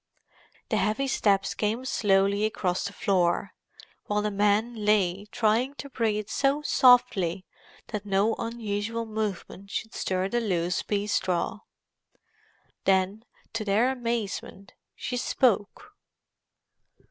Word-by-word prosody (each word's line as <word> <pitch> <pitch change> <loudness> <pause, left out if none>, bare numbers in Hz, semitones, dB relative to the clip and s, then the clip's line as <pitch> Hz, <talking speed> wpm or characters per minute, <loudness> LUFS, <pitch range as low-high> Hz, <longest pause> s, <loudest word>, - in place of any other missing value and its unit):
The - - +1
heavy 220 +6 +1
steps 200 -6 +2
came 220 +4 -1
slowly 200 -3 +2
across 185 -4 -1
the 200 - -3
floor, 185 -1 +1 0.5
while 210 0 0
the 210 - 0
men 205 +3 +2
lay 200 -2 +2
trying 230 +5 +1
to 280 -1 -8
breath 215 -4 -1
so 280 +5 +1
softly 210 - +4 0.4
that 210 -3 -4
no 205 +2 +2
unusual 230 0 -3
movement 210 -3 -4
should 220 +2 -4
stir 185 0 -1
the 240 +4 0
loose 180 -4 0
pea 205 -1 -1
straw. 185 -1 -1 1.3
Then, 195 +3 +1 0.3
to 225 -1 -2
their 215 +5 +2
amazement, 230 -5 -4 0.2
she 250 - -4
spoke. 245 - 0
210 Hz, 115 wpm, -27 LUFS, 195-230 Hz, 1.3 s, softly